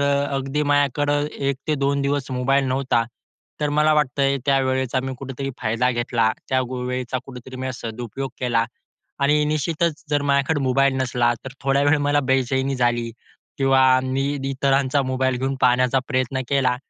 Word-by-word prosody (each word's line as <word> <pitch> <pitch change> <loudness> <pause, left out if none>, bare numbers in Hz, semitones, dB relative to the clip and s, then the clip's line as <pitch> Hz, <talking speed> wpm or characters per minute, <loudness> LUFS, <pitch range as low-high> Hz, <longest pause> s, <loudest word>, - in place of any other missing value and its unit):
अ, 140 0 +2
अगदी 135 +2 -1
माझ्याकडं 145 0 +1 0.2
1-2 140 0 -1
दिवस 140 -1 -1
मोबाईल 135 +2 +1
नव्हता. 130 -2 +1 0.6
तर 150 - +1
मला 150 +1 +3
वाटतंय, 140 -1 +1
त्यावेळेचा 130 -2 +1
मी 130 - -3
कुठेतरी 135 0 -5
फायदा 115 +2 +1
घेतला 120 -2 +1 0.2
त्या, 130 0 +2
गो 125 0 -5
वेळेचा 125 0 -2
कुठेतरी 130 0 -10
मी 130 0 -3
सदुपयोग 120 +3 -6
केला 120 -2 +1 0.6
आणि 150 +2 +3
निश्चितच 155 +1 -1
जर 145 -1 +1
माझ्याकडे 140 +2 +1
मोबाईल 135 +1 +3
नसला 125 -2 +1
तर 130 - -7
थोड्या 135 +1 +2
वेळ 145 +2 +4
मला 145 0 +3
बेचैनी 130 +1 +1
झाली 120 -1 0 0.5
किंवा 130 -1 +4
मी 130 +1 -1 0.3
इतरांचा 135 +1 +1
मोबाईल 130 0 0
घेऊन 135 +2 -1
पाहण्याचा 125 +1 +3
प्रयत्न 130 -1 0
केला, 135 -3 +2
135 Hz, 150 wpm, -22 LUFS, 125-140 Hz, 0.6 s, वेळ